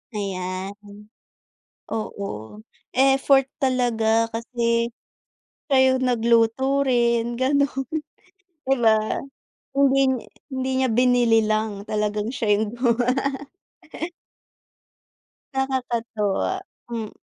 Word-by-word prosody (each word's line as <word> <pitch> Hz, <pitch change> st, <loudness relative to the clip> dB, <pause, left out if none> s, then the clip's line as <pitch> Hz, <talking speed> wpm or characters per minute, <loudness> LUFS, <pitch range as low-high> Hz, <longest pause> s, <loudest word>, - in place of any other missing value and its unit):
Ayan, 185 Hz, -1 st, -3 dB, 1.2 s
oo. 200 Hz, -, -5 dB, 0.3 s
Effort 270 Hz, 0 st, +4 dB, 0.2 s
talaga 230 Hz, -3 st, +2 dB
kasi 235 Hz, 0 st, 0 dB, 0.8 s
kayo 260 Hz, -1 st, +4 dB
nagluto 240 Hz, +3 st, +2 dB
rin 235 Hz, -2 st, +1 dB
ganun, 270 Hz, 0 st, +1 dB, 0.8 s
di 270 Hz, -, +4 dB
ba? 220 Hz, +1 st, +2 dB, 0.5 s
Hindi 275 Hz, -1 st, +4 dB
niya, 255 Hz, -3 st, -2 dB, 0.2 s
hindi 260 Hz, -1 st, -3 dB
niya 260 Hz, -, +2 dB
binili 245 Hz, -1 st, +4 dB
lang. 215 Hz, -1 st, -1 dB
Talagang 210 Hz, +2 st, -1 dB
siya 225 Hz, -5 st, -2 dB
yung 215 Hz, +1 st, -2 dB
gumawa. 245 Hz, 0 st, +2 dB, 2.4 s
Nakakatuwa, 245 Hz, -, -1 dB, 0.4 s
mm. 225 Hz, -3 st, -3 dB
235 Hz, 80 wpm, -23 LUFS, 220-260 Hz, 2.4 s, Effort